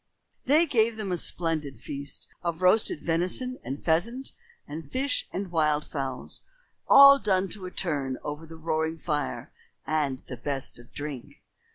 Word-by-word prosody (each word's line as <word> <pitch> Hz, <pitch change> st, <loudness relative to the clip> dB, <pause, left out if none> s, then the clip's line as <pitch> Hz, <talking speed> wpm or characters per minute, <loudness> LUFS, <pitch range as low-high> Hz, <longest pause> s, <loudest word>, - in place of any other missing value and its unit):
They 305 Hz, +6 st, +5 dB
gave 230 Hz, -6 st, +2 dB
them 205 Hz, -3 st, -3 dB
a -, -, +1 dB
splendid 160 Hz, -5 st, -1 dB
feast 140 Hz, 0 st, -4 dB, 0.2 s
of 170 Hz, 0 st, -3 dB
roasted 185 Hz, -4 st, +4 dB
venison 185 Hz, +10 st, +1 dB
and 135 Hz, +3 st, -6 dB
pheasant 230 Hz, +12 st, +1 dB, 0.4 s
and 150 Hz, 0 st, -8 dB
fish 270 Hz, +1 st, 0 dB
and 190 Hz, -1 st, -4 dB
wild 150 Hz, -3 st, +2 dB
fowls, 135 Hz, -3 st, -2 dB, 0.5 s
all 275 Hz, 0 st, +9 dB
done 190 Hz, -4 st, +1 dB
to 185 Hz, 0 st, -4 dB
a -, -, -8 dB
turn 140 Hz, -9 st, -2 dB
over 150 Hz, +2 st, -6 dB
the 165 Hz, -, -10 dB
roaring 160 Hz, 0 st, -1 dB
fire, 150 Hz, -, -3 dB, 0.3 s
and 150 Hz, -4 st, 0 dB
the 125 Hz, -, -7 dB
best 135 Hz, -3 st, -4 dB
of 120 Hz, -, -16 dB
drink. 145 Hz, -4 st, -7 dB
165 Hz, 155 wpm, -27 LUFS, 145-195 Hz, 0.5 s, all